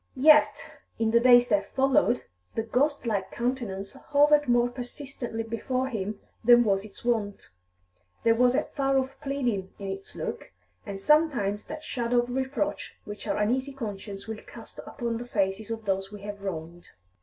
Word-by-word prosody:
Yet, 300 +3 +4 0.2
in 225 -1 +1
the 235 - +5
days 245 0 +7
that 200 -2 0
followed, 265 -2 +3 0.3
the 225 - 0
ghostlike 235 -5 0
countenance 235 -6 -3
hovered 290 +1 +3
more 240 0 +4
persistently 245 -1 -6
before 255 +3 -2
him 210 -3 -4 0.2
than 240 +1 +7
was 195 -3 +1
its 215 +2 -13
wont; 215 -4 -1 0.7
there 230 - +5
was 245 +2 +3
a - - +2
far 275 -2 0
off 265 +1 -2
pleading 245 -9 -2
in 195 -1 -6
its 195 0 -8
look, - - -5 0.4
and 195 -1 -5
sometimes 255 -7 +2
that 310 - -7
shadow 245 -1 -1
of 245 - -7
reproach 265 -4 -2
which 210 0 -8
our - - 0
uneasy 255 +6 0
conscience 205 -5 -6
will 220 -1 -5
cast - - -12
upon 235 -3 -3
the 240 - -7
faces 200 -1 -1
of 225 -1 -5
those 195 0 -1
we 205 -1 -9
have 205 -1 -7
wronged. 175 -2 -6
235 Hz, 165 wpm, -27 LUFS, 205-260 Hz, 0.7 s, days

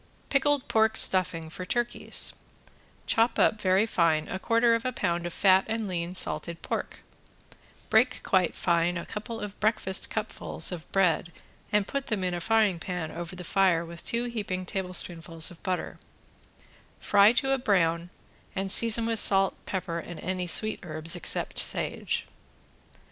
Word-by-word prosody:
~PICKLED 285 0 +1
PORK 220 0 +2
STUFFING 165 -4 +2
FOR 185 - -7
TURKEYS~ 240 +5 0 0.7
Chop 230 +1 +1
up 215 - +2
very 190 +3 +3
fine 165 -7 +1
a 190 - -4
quarter 230 +3 +2
of 230 0 0
a 255 - -1
pound 175 -6 -2
of - - -6
fat 190 -1 +4
and 225 -1 -3
lean 175 -1 -4
salted 170 -2 +1
pork, - - -4 0.9
break - - +3
quite 185 -3 +1
fine 170 0 +1
a 170 - -6
couple 225 +2 -7
of 205 -1 -8
breakfast 215 -3 0
cupfuls 220 -2 -2
of 170 -3 -8
bread 180 -3 +1 0.4
and 210 -2 +2
put 275 0 -4
them 210 -4 -2
in 180 -1 -1
a 175 - -4
frying 215 -3 +2
pan 165 -2 -5
over 175 +1 -7
the 180 - -8
fire 180 -2 +2
with 170 0 -9
two 235 +1 -1
heaping 205 -6 -4
tablespoonfuls 175 -3 -1
of 170 - -15
butter, 185 -1 -4 1.0
fry 205 +1 +5
to 270 +2 0
a 270 - +1
brown 170 -6 +1 0.5
and 195 0 0
season 230 +1 +5
with 225 -1 +2
salt, 195 -1 +5
pepper 180 -3 -3
and 170 0 -9
any 185 -1 -3
sweet 215 +5 +3
herbs 160 0 -4
except 175 - -2
sage. - - 0
185 Hz, 160 wpm, -27 LUFS, 170-220 Hz, 1.0 s, fry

